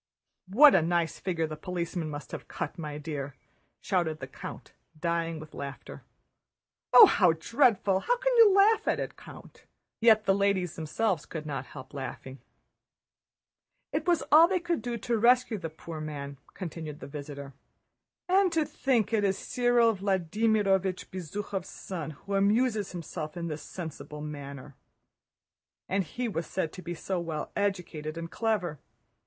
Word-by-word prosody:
"What 275 +10 +8
a 185 - +5
nice 170 0 0
figure 170 -4 -1
the 155 -1 -5
policeman 170 0 -3
must 145 -4 -7
have - - -7
cut, - - -4
my 150 -2 -5
dear!" 145 -2 -5 0.5
shouted 170 -5 0
the 130 - -5
count, 130 - -9 0.3
dying 165 -1 -1
with 155 0 -11
laughter. 140 0 -7 0.9
"Oh, 455 - +11
how 180 - +4
dreadful! 200 - +2
How - - +1
can - - +1
you 450 -3 +8
laugh 410 +3 +4
at - - +2
it, - - -4
Count?" - - -14 0.3
Yet 220 -2 +5
the 195 - +4
ladies 195 -4 +1
themselves 165 +2 -1
could 155 -2 -6
not 140 -3 -4
help 130 - -11
laughing. 135 -1 -7 1.5
"It 310 +3 -1
was 345 -2 +3
all 320 +3 +9
they 370 0 +1
could 345 -1 -1
do 240 -1 -3
to 235 0 -1
rescue 240 -1 +4
the 165 - -4
poor 160 0 -8
man," 140 -3 -6 0.2
continued 160 -4 -6
the - - -8
visitor. 140 -1 -8 0.7
"And 375 0 +4
to 320 -2 +2
think 235 -6 0
it 215 -2 +2
is 195 -1 +1
Cyril 240 -1 +2
Vladímirovich 195 0 +1
Bezúkhov's 190 +2 -5
son 170 -5 -6 0.2
who 200 - -4
amuses 210 +2 +2
himself 165 -2 -6
in 170 -1 -3
this 155 -1 -5
sensible 155 -3 -7
manner! 140 -2 -8 1.1
And 195 +1 +1
he 240 +10 -4
was 165 -7 -3
said 175 -4 -2
to 185 - -8
be 175 -1 -5
so 185 +2 -3
well 160 -3 -4
educated 175 -6 -2
and 165 0 -6
clever. 205 - -1
180 Hz, 155 wpm, -29 LUFS, 155-220 Hz, 1.5 s, Oh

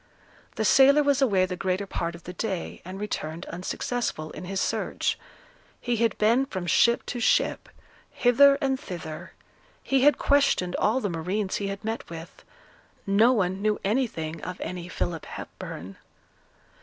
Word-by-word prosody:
The - - -1
sailor 280 +2 +6
was 285 -1 +2
away 195 -8 +3
the 185 0 -4
greater 185 +2 -1
part 170 -3 -3
of 170 - -13
the 180 - -7
day, 190 -2 -4
and 185 +2 -8
returned 170 -5 -4
unsuccessful 180 -2 -3
in - - -8
his 195 +1 -3
search; - - -1 0.6
he 240 -1 -1
had 230 -2 +1
been 235 +6 +3
from 185 -8 -4
ship 235 +6 +3
to 245 - -4
ship, 230 - +1 0.4
hither 275 +3 +5
and 265 -1 0
thither; 165 - -7 0.5
he 270 -1 +2
had 295 +2 +5
questioned 280 -11 +2
all 230 +5 +2
the 205 - -1
marines 185 +5 -2
he 200 - -3
had 200 +2 -6
met 225 +1 -4
with, 165 0 -10 0.6
no 210 +5 +5
one 190 -5 0
knew 215 0 +1
anything 195 -8 -1
of 180 0 -6
any 180 -1 -5
Philip 165 -3 -3
Hepburn. 95 +5 -8
200 Hz, 155 wpm, -26 LUFS, 180-245 Hz, 0.6 s, sailor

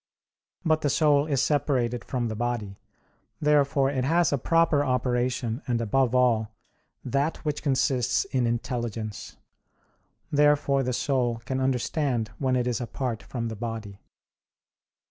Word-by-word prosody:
But 155 -1 +2
the 145 - +1
soul 145 -1 +3
is 140 -4 +1
separated 125 -5 0
from 125 -2 -2
the 110 - -4
body; 110 -4 -3 0.6
therefore 140 -3 +3
it 130 -2 -1
has 165 +2 +2
a 140 - +1
proper 165 -1 +3
operation 125 -1 -1
and 120 -2 0
above 125 +2 +1
all, 115 -4 +3 0.6
that 140 +5 0
which 150 -1 -2
consists 130 -3 +1
in 125 -2 0
intelligence. 115 -3 -4 0.9
Therefore 145 -1 +3
the 125 -1 -1
soul 120 -3 0
can 130 +3 -2
understand 130 -2 0
when 130 -2 +1
it 125 -1 +1
is 125 -1 -1
apart 120 -1 -3
from 115 -2 -4
the 110 - -5
body. 110 -3 -6
125 Hz, 135 wpm, -26 LUFS, 120-140 Hz, 0.9 s, soul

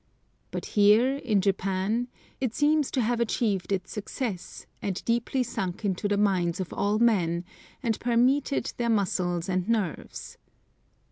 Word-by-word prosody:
But - - -5
here, 220 +6 +5
in 220 -8 +1
Japan, 195 +4 0 0.3
it 255 -4 -2
seems 300 -1 +3
to 260 - 0
have 235 +1 0
achieved 215 -5 0
its 185 -2 -1
success, 210 -2 -5 0.2
and 195 -2 -3
deeply 240 +3 +1
sunk 195 -4 -4
into 195 +1 0
the 205 0 +1
minds 185 -3 +1
of 185 - -4
all 205 +1 +1
men, 180 -7 +2 0.4
and 225 -3 0
permeated 245 +3 +2
their 235 -1 0
muscles 180 -4 0
and 185 +2 -1
nerves. 210 -8 -3
210 Hz, 140 wpm, -27 LUFS, 185-235 Hz, 0.4 s, here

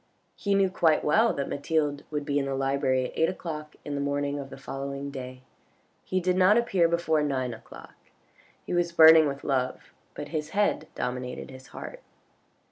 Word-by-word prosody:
He 200 -1 0
knew 195 -1 +3
quite 160 -4 +3
well 220 +10 +4
that 140 - -3
Mathilde 145 0 -1
would 150 -1 -3
be 145 -1 +1
in 140 - -1
the 135 0 -2
library 135 -1 +1
at - - -5
eight 160 - +2
o'clock 155 -4 -6
in 145 - -4
the 140 - -2
morning 145 0 -1
of 135 -1 -7
the - - -10
following 140 +1 -5
day. 130 -1 -8 0.6
He 185 - -1
did 180 0 +1
not 190 +4 +5
appear 195 -8 +3
before 165 -2 +1
nine 130 -4 -1
o'clock. - - -13 0.7
He - - -4
was 175 -1 +1
burning 160 -1 +8
with 140 0 -5
love, 130 -2 -2 0.2
but - - -6
his 155 -2 -3
head 205 0 +1
dominated 125 +1 -4
his 130 0 -12
heart. - - -9
145 Hz, 185 wpm, -27 LUFS, 135-170 Hz, 0.7 s, burning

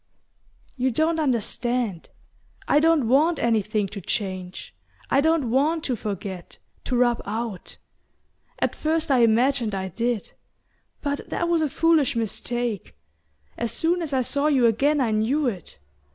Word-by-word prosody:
"You 260 +1 +1
don't 315 +6 +1
understand. 240 - -1 0.6
I 290 - +4
don't 320 -5 +3
want 300 +7 +3
anything 215 -3 +1
to 200 - -7
change. 185 -2 -4 0.4
I 275 - +4
don't 310 -6 +1
want 305 +5 +2
to 255 - -1
forget 195 -4 -6 0.3
to 250 - 0
rub 240 -1 +2
out. 215 -2 -5 0.8
At - - 0
first 315 -1 -1
I 260 - +4
imagined 235 -1 +3
I 190 0 -3
did; 230 +3 -2 0.7
but 285 -1 -3
that 345 - -1
was 340 -1 +2
a 305 - +1
foolish 315 -3 +2
mistake. 230 -1 -3 0.6
As 235 -1 -1
soon 345 +2 0
as 320 -3 -4
I 260 -2 +1
saw 280 +4 0
you 270 -5 +3
again 280 +7 +3
I 240 -4 +1
knew 235 +8 +1
it... 195 - -4
245 Hz, 145 wpm, -24 LUFS, 220-295 Hz, 0.8 s, I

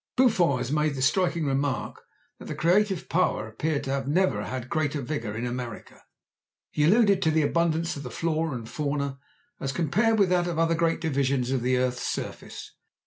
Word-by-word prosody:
Buffon 190 - +3
has 125 - -3
made 150 -1 +1
the 130 - -4
striking 170 +2 +2
remark 135 -1 -1 0.4
that - - -10
the - - -5
creative 190 +1 +2
power 160 -10 +1
appeared 145 +7 -2
to 135 - -3
have 135 -1 -2
never 185 +6 +1
had 130 -1 -5
great 155 0 -1
vigour 125 -6 -3
in 115 +2 -3
America. 120 -2 -6 0.7
He 150 - +1
alluded 200 +1 +4
to 160 - +3
the 155 0 +2
abundance 165 +2 +1
of 140 - -6
the 125 - -6
flora 160 +2 -1
and 115 -2 -6
fauna 140 0 -3 0.4
as 135 - -2
compared 215 +9 +1
with 200 -3 +4
that 175 -1 +2
of 170 -2 -3
other 165 0 +2
great 165 0 +1
divisions 135 -5 0
of 130 -2 0
the 125 +1 +1
earth's 125 0 0
surface. - - -5
150 Hz, 190 wpm, -26 LUFS, 130-170 Hz, 0.7 s, alluded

